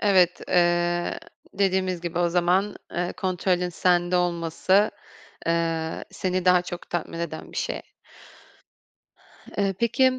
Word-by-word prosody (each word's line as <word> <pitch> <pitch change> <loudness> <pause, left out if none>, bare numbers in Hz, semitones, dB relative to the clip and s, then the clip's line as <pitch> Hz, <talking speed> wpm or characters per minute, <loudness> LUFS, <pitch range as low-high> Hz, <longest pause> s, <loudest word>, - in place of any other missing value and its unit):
Evet, 185 -4 +4
eee, 175 0 +2 0.4
dediğimiz 190 -2 +1
gibi 175 0 -3
o 175 -1 +3
zaman, 180 +4 +2 0.2
eee, 175 0 -1
kontrolün 180 -1 0
sende 175 +1 +2
olması, 175 +3 +2 0.6
eee, 165 -1 0
seni 185 -1 -2
daha 180 -1 +5
çok 175 -1 -8
tatmin 170 -1 -3
eden 165 -2 -5
bir - - -9
şey. - - -2 1.8
Eee, 195 -1 +2
peki, 235 +6 +1
180 Hz, 120 wpm, -25 LUFS, 175-185 Hz, 1.8 s, daha